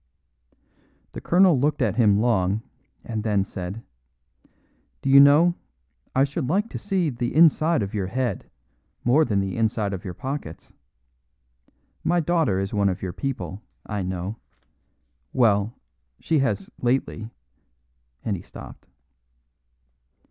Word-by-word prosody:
The -, -, -8 dB
colonel 175 Hz, -5 st, +4 dB
looked 145 Hz, +2 st, +1 dB
at -, -, +1 dB
him 105 Hz, -4 st, +4 dB
long, 105 Hz, -2 st, +1 dB, 0.4 s
and 110 Hz, -2 st, -4 dB
then 105 Hz, -3 st, +1 dB
said, 95 Hz, +4 st, -6 dB, 1.2 s
"Do 135 Hz, -, +1 dB
you 140 Hz, -, +9 dB
know, 150 Hz, +5 st, +6 dB, 0.6 s
I 135 Hz, -, +4 dB
should 140 Hz, -1 st, -2 dB
like 205 Hz, +7 st, +1 dB
to -, -, -5 dB
see 190 Hz, -6 st, 0 dB
the 120 Hz, +1 st, -3 dB
inside 160 Hz, -2 st, +4 dB
of 100 Hz, -, -6 dB
your 100 Hz, -3 st, -2 dB
head 120 Hz, -1 st, -3 dB, 0.5 s
more 135 Hz, +6 st, +4 dB
than 105 Hz, -5 st, 0 dB
the 95 Hz, -1 st, -2 dB
inside 110 Hz, -3 st, 0 dB
of 95 Hz, -, -5 dB
your 90 Hz, -2 st, -6 dB
pockets. 130 Hz, -, -6 dB, 1.3 s
My 175 Hz, +1 st, +2 dB
daughter 160 Hz, -, +1 dB
is 95 Hz, +2 st, -3 dB
one 100 Hz, -1 st, +2 dB
of 95 Hz, -, -4 dB
your 90 Hz, -2 st, -3 dB
people, 95 Hz, -, -4 dB, 0.2 s
I 105 Hz, -2 st, -3 dB
know; 95 Hz, +3 st, -4 dB, 1.0 s
well, 110 Hz, -2 st, +2 dB, 0.4 s
she 160 Hz, -2 st, +1 dB
has 105 Hz, -8 st, -1 dB
lately 120 Hz, -3 st, -1 dB, 0.5 s
" 60 Hz, -1 st, -41 dB
and 105 Hz, -, 0 dB
he 90 Hz, -, -7 dB
stopped. -, -, -12 dB
115 Hz, 135 wpm, -24 LUFS, 95-140 Hz, 1.3 s, you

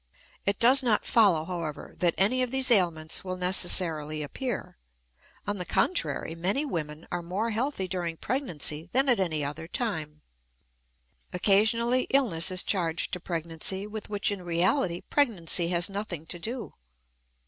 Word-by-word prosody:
It 200 Hz, 0 st, +2 dB
does 260 Hz, +4 st, +5 dB
not 230 Hz, -5 st, +2 dB
follow, 190 Hz, -9 st, +4 dB
however, 170 Hz, -4 st, -5 dB
that 175 Hz, -2 st, +2 dB
any 245 Hz, +7 st, +2 dB
of 250 Hz, -, 0 dB
these 265 Hz, 0 st, +1 dB
ailments 170 Hz, -7 st, +2 dB
will 185 Hz, -1 st, -4 dB
necessarily 170 Hz, -4 st, +2 dB
appear. 235 Hz, -, -5 dB, 0.7 s
On 205 Hz, 0 st, -2 dB
the 180 Hz, -, -3 dB
contrary, 180 Hz, -, 0 dB
many 190 Hz, -, -1 dB
women 155 Hz, -, -5 dB
are 175 Hz, -, -2 dB
more 195 Hz, +7 st, -2 dB
healthy 225 Hz, -3 st, -2 dB
during 175 Hz, -3 st, -3 dB
pregnancy 170 Hz, -, -2 dB
than 270 Hz, +3 st, +3 dB
at 245 Hz, -5 st, +3 dB
any 160 Hz, -6 st, 0 dB
other 150 Hz, +3 st, -6 dB
time. 155 Hz, -9 st, -4 dB, 1.1 s
Occasionally 220 Hz, +7 st, +2 dB
illness 200 Hz, -11 st, +3 dB
is 185 Hz, 0 st, +1 dB
charged 170 Hz, -4 st, -1 dB
to 180 Hz, -, -2 dB
pregnancy 170 Hz, +3 st, -3 dB
with 210 Hz, 0 st, -7 dB
which 205 Hz, 0 st, 0 dB
in 200 Hz, -2 st, -4 dB
reality 175 Hz, +2 st, 0 dB
pregnancy 185 Hz, -, +2 dB
has 175 Hz, -1 st, +2 dB
nothing 195 Hz, -5 st, -5 dB
to 175 Hz, -, -5 dB
do. 230 Hz, +7 st, -5 dB
185 Hz, 150 wpm, -27 LUFS, 165-225 Hz, 1.1 s, does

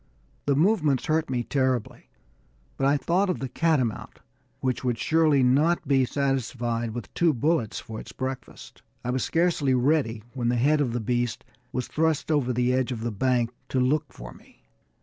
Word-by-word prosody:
The 140 Hz, -, +3 dB
movements 155 Hz, -, +2 dB
hurt 160 Hz, 0 st, 0 dB
me 125 Hz, -2 st, -1 dB
terribly, 130 Hz, -3 st, -1 dB, 0.7 s
but 135 Hz, -, +1 dB
I 145 Hz, +1 st, +3 dB
thought 185 Hz, +7 st, +1 dB
of 180 Hz, -, 0 dB
the 135 Hz, -, -4 dB
catamount, 130 Hz, -5 st, 0 dB, 0.4 s
which 130 Hz, -1 st, -1 dB
would 125 Hz, -2 st, 0 dB
surely 155 Hz, -1 st, +3 dB
not 150 Hz, +7 st, +2 dB
be 135 Hz, -2 st, +3 dB
satisfied 120 Hz, -4 st, -2 dB
with 120 Hz, -5 st, -7 dB
two 165 Hz, -4 st, +2 dB
bullets 135 Hz, -2 st, 0 dB
for 110 Hz, -1 st, -8 dB
its -, -, -10 dB
breakfast. 130 Hz, 0 st, -7 dB, 0.2 s
I 125 Hz, -, 0 dB
was 130 Hz, -1 st, -1 dB
scarcely 165 Hz, -6 st, +1 dB
ready 125 Hz, -4 st, +1 dB
when 120 Hz, -3 st, -1 dB
the 120 Hz, -, +1 dB
head 145 Hz, +5 st, +3 dB
of 125 Hz, -5 st, 0 dB
the 120 Hz, -, -1 dB
beast 120 Hz, 0 st, -1 dB, 0.3 s
was 125 Hz, 0 st, -3 dB
thrust 160 Hz, 0 st, 0 dB
over 140 Hz, -5 st, +1 dB
the 125 Hz, +1 st, +1 dB
edge 130 Hz, 0 st, 0 dB
of 115 Hz, -3 st, -4 dB
the 120 Hz, 0 st, -2 dB
bank 120 Hz, +2 st, +1 dB, 0.2 s
to 130 Hz, -, 0 dB
look 145 Hz, +4 st, +1 dB
for -, -, -10 dB
me. -, -, -21 dB
130 Hz, 180 wpm, -26 LUFS, 120-150 Hz, 0.7 s, The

